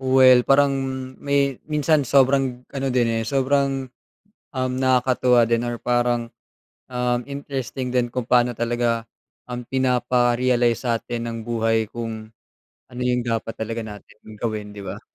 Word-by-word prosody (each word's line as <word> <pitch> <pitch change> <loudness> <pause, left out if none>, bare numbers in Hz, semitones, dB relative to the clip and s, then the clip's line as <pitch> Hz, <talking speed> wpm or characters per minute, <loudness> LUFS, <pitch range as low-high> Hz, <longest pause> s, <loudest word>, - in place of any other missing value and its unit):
Well, 130 -1 +6
parang 140 0 +4 0.4
may 140 -2 0
minsan 150 -1 +1
sobrang 130 -1 +2
ano 135 -1 -4
din 120 -2 +2
eh, 115 - -1
sobrang, 135 0 0 0.7
um, 130 -1 -1
nakakatuwa 125 -1 +3
din 115 +1 +1
or 120 -1 -4
parang, 120 -1 0 0.6
um, 125 -1 0
interesting 135 -1 -5
din 120 -1 +1
kung 125 -1 -3
paano 125 -1 +4
talaga 120 -1 -1 0.4
ang 125 0 -5
pinapa-realize 125 -1 +1
sa'tin 115 -1 -2
ng 115 - -5
buhay 115 -1 +1
kung 110 -1 -6 0.7
ano 125 - -6
yung 125 -1 0
dapat 115 -1 -3
talaga 115 +1 -3
natin 105 0 -11
gawin, 110 -2 -3
di 100 -1 -9
ba? 100 +3 -6
125 Hz, 135 wpm, -22 LUFS, 115-130 Hz, 0.7 s, Well